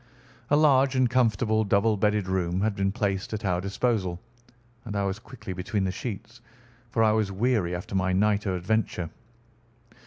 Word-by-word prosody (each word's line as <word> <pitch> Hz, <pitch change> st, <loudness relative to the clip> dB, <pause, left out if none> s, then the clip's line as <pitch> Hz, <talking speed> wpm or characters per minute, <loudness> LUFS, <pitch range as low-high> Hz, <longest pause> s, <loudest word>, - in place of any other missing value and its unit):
A 145 Hz, -, +4 dB
large 140 Hz, -3 st, +4 dB
and 130 Hz, -1 st, +4 dB
comfortable 110 Hz, -3 st, +2 dB
double 105 Hz, +2 st, +2 dB
bedded 105 Hz, -1 st, +1 dB
room 95 Hz, -1 st, 0 dB
had 105 Hz, -1 st, 0 dB
been 95 Hz, 0 st, 0 dB
placed 100 Hz, -2 st, -2 dB
at 105 Hz, -, -5 dB
our 90 Hz, -2 st, +1 dB
disposal, 100 Hz, -3 st, -1 dB, 0.6 s
and 105 Hz, -4 st, -6 dB
I 100 Hz, -, 0 dB
was 100 Hz, +1 st, -2 dB
quickly 110 Hz, -5 st, -8 dB
between 95 Hz, +2 st, -2 dB
the 95 Hz, -, 0 dB
sheets, 115 Hz, +3 st, -7 dB, 0.5 s
for 115 Hz, -2 st, +1 dB
I 110 Hz, -, +5 dB
was 105 Hz, -2 st, +1 dB
weary 100 Hz, -4 st, 0 dB
after 90 Hz, +2 st, -7 dB
my 95 Hz, -1 st, +1 dB
night 105 Hz, +2 st, +2 dB
of 95 Hz, -, 0 dB
adventure. 90 Hz, -2 st, -1 dB
105 Hz, 175 wpm, -26 LUFS, 95-115 Hz, 0.6 s, I